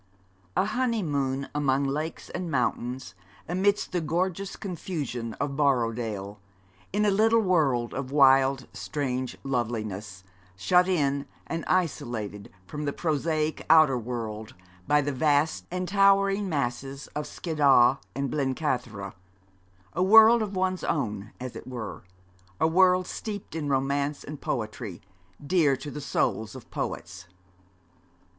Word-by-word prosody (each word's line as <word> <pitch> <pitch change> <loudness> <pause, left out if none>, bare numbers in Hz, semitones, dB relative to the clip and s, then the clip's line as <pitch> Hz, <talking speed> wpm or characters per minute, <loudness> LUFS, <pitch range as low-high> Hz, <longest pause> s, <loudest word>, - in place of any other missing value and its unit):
A - - +3
honeymoon 160 - -1
among 140 -2 +1
lakes 150 +4 -3
and 175 -1 -4
mountains, 125 -4 -2 0.3
amidst 195 +4 +1
the 180 -2 0
gorgeous 180 +4 -1
confusion 150 - -4
of 140 0 -3
Borrowdale, 115 -7 0 0.5
in 210 +2 +1
a 205 - +4
little 225 +3 +4
world 150 - +2
of 135 -1 -4
wild, 135 -2 +5
strange 130 -4 -3
loveliness, 110 -7 -3 0.3
shut 180 - +3
in 140 -6 0 0.2
and 165 -1 -4
isolated 120 - -2
from 150 +8 -5
the 140 - -1
prosaic 155 -1 -1
outer 155 -4 +7
world 110 -3 -5 0.3
by 150 0 +4
the 145 +1 -1
vast 145 +3 +1
and 180 +1 -3
towering 195 0 +3
masses 135 -1 -3
of 150 0 -3
Skiddaw 140 -6 +4 0.2
and 140 -1 -2
Blencathara 125 -8 -2 0.8
a 175 - -1
world 225 +4 +8
of 205 -2 -3
one's 185 0 0
own, 105 -8 -2
as 125 -1 -6
it - - -9
were, 120 -4 -6 0.6
a - - +3
world 180 +2 +4
steeped 205 +1 -6
in 155 -3 -3
romance 140 +2 0
and 150 -1 -8
poetry, 110 -5 -4 0.5
dear 155 -4 +3
to 145 +2 -7
the 150 - -6
souls 110 -4 -1
of 130 - -12
poets. 90 +1 -5
140 Hz, 125 wpm, -27 LUFS, 125-175 Hz, 0.8 s, world